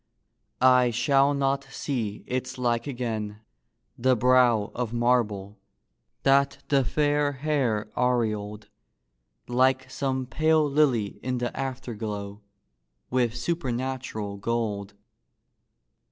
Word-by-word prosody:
I 125 -1 +5
shall 135 +4 +3
not 140 0 0
see 125 -6 -4
its 130 +1 -3
like 120 -1 0
again! 110 -5 -4 0.6
the 130 +1 +3
brow 125 -3 +3
Of 120 -2 -3
marble, 110 -5 0 0.6
that 140 0 +3
the 140 -2 +4
fair 145 +2 +1
hair 130 -7 0
aureoled, 110 -4 -1 0.8
Like 130 +1 +2
some 130 -2 -2
pale 155 +3 +2
lily 135 -8 +1
in 125 0 -2
the 120 0 -3
afterglow, 110 -6 -5 0.7
With 120 -2 +1
supernatural 130 -8 -3
gold. 105 -2 -2
125 Hz, 95 wpm, -26 LUFS, 110-135 Hz, 0.8 s, I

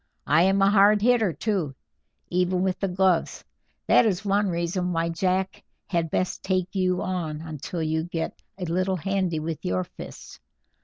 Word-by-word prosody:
I 155 +4 +4
am 195 +2 +3
a 195 - +5
hard 205 +1 +6
hitter, 235 -5 +4
too, 175 -8 -2 0.6
even 180 +1 +1
with 190 -1 -1
the 195 - 0
gloves; 185 -2 +1 0.4
that - - +5
is 205 -2 0
one 200 0 +2
reason 175 +1 -1
why 165 0 0
Jack 185 +3 -1 0.2
had 170 -3 -1
best 185 +4 -1
take 185 -1 -1
you 185 -2 +1
on 170 -5 -3
until 160 +1 -5
you 160 +1 -1
get 165 -2 -4 0.2
a 185 - -4
little 185 +3 0
handy 185 -2 -1
with 160 -1 -5
your 90 0 0
fists. - - -11
180 Hz, 165 wpm, -25 LUFS, 165-195 Hz, 0.6 s, hard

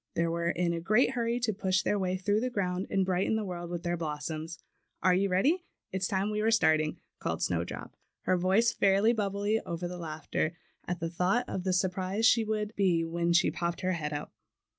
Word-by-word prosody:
They 170 - +2
were 170 0 0
in 170 0 0
a 170 - -2
great 215 +8 +3
hurry 235 -1 0
to 225 -2 +1
push 190 -1 +1
their 205 - +1
way 185 -1 0
through 205 +3 +1
the 250 +3 -1
ground 185 -5 -2
and 195 -1 +1
brighten 185 +3 +1
the 220 - -1
world 175 -2 -5
with 175 -1 -4
their 175 0 -1
blossoms. 160 +1 -4 0.5
"Are 185 - +5
you 195 +2 +2
ready? 285 - +2 0.3
It's 190 0 -1
time 195 +2 0
we 210 0 -1
were 220 - +3
start 160 -9 +4
ing," 155 0 -3 0.2
called - - -2
Snowdrop, - - -3 0.3
her 185 - +2
voice 190 +6 +3
fairly 200 +4 +4
bub 205 -4 -1
bling 205 +2 0
over 170 +1 -4
with 180 0 -7
laughter, 160 0 -3 0.3
at 175 0 -2
the 165 - -1
thought 185 +8 +1
of 185 - -4
the 190 - +2
surprise 185 +3 0
she 230 0 +5
would 215 0 -2
be 175 -4 +2
when 170 +1 0
she 170 +1 +4
popped 170 0 -3
her 185 - +1
head 155 -4 -2
up. 145 0 -5
185 Hz, 220 wpm, -30 LUFS, 170-210 Hz, 0.5 s, Are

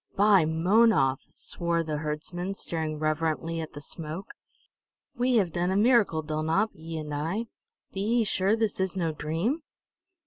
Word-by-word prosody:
"By 200 -4 +5
Mownoth!" 165 - +3
swore 170 -1 -1
the 155 -2 -3
herdsman, 165 +5 -4
staring 160 -4 -3
reverently 160 +2 -1
at 160 - -7
the 145 - -8
smoke. 160 +5 -6 0.8
"We 250 -1 +1
have 190 -8 +2
done 175 +1 0
a 190 - +1
miracle, 210 -8 +4
Dulnop 160 +7 0
ye 160 +1 -7
and 150 -1 -5
I! 165 +10 -2 0.5
Be 195 - -3
ye 230 +3 +2
sure 195 0 +2
this 220 -3 -1
is 190 -1 0
no 170 -4 0
dream?" 165 - -1
170 Hz, 150 wpm, -28 LUFS, 155-205 Hz, 0.8 s, By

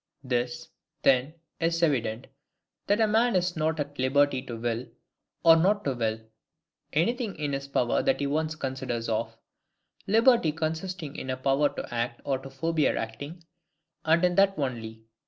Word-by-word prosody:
This, 120 -1 -2 0.4
then, 135 +3 +3 0.2
is 165 0 0
evident, 120 -6 +1 0.6
That 205 +2 +2
A 220 - +5
MAN 225 +1 +2
IS 180 0 +1
NOT 160 0 0
AT 145 -1 -4
LIBERTY 135 0 +3
TO 120 -3 -7
WILL, 115 +1 -2 0.6
OR 165 -1 +8
NOT 200 +5 +2
TO 140 - +1
WILL, 110 -2 -2 0.7
ANYTHING 220 - 0
IN 145 -2 -3
HIS 135 0 -3
POWER 125 -3 +1
THAT 270 0 +1
HE - - 0
ONCE 155 +2 -1
CONSIDERS 130 -5 -3
OF: 115 0 -2 0.7
liberty 225 - +4
consisting 160 0 -4
in 130 - -6
a 130 - -1
power 135 +2 +2
to - - -6
act 120 0 -2
or 135 -2 -1
to 135 +1 -10
forbear 155 +3 0
acting, 140 +10 -6 0.6
and 165 +3 +4
in 180 - +2
that 195 +1 +3
only. 115 -5 -4
145 Hz, 160 wpm, -27 LUFS, 125-165 Hz, 0.7 s, OR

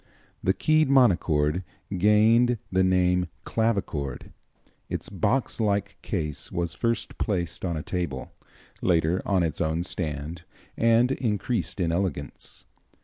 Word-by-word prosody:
The 95 - +2
keyed 155 -2 +3
monochord 90 - +3 0.3
gained 110 +5 +4
the 95 0 +3
name 90 -1 +2 0.2
clavichord. 100 - -1 0.6
Its - - -4
box 105 +8 0
like 100 -2 -1
case 75 -7 -3
was 85 -1 -2
first 115 -1 -2
placed 90 -6 -2
on 85 -3 -1
a 75 - -4
table, 85 -8 -4 0.5
later 85 +1 +2
on 95 -3 +2
its 80 -1 -2
own 80 +1 0
stand, 80 -2 -4 0.3
and 115 +2 +4
increased 115 -3 -1
in 85 -3 +1
elegance. 85 -5 -4
95 Hz, 120 wpm, -26 LUFS, 85-110 Hz, 0.6 s, gained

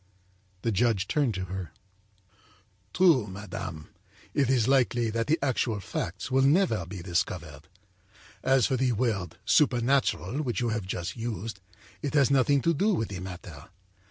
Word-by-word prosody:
â 95 0 -37
The 115 - +1
judge 100 -2 +1
turned 140 -8 +1
to 95 0 -3
her: 95 -3 -6 1.2
âTrue, 160 - +4
madame, 95 -5 -7 0.4
it 135 -3 +2
is 125 -4 +3
likely 120 -4 +2
that 115 +1 -1
the 160 +3 +3
actual 120 -5 0
facts 95 +4 -5
will 135 +1 +4
never 135 - +3
be 90 -2 -7
discovered. 85 -4 -3 0.7
As 130 -2 +3
for 130 - +1
the 125 -1 +1
word 105 -7 -1
'supernatural' 135 0 +2
which 120 -8 -2
you 120 - 0
have 110 -4 -3
just 90 -1 -4
used, 115 -3 -4 0.4
it 145 -1 -3
has 140 -2 +4
nothing 140 0 +3
to 170 - +3
do 200 +6 +2
with 115 - -2
the 95 -2 -5
matter. 90 -5 -9
115 Hz, 155 wpm, -28 LUFS, 95-130 Hz, 1.2 s, âTrue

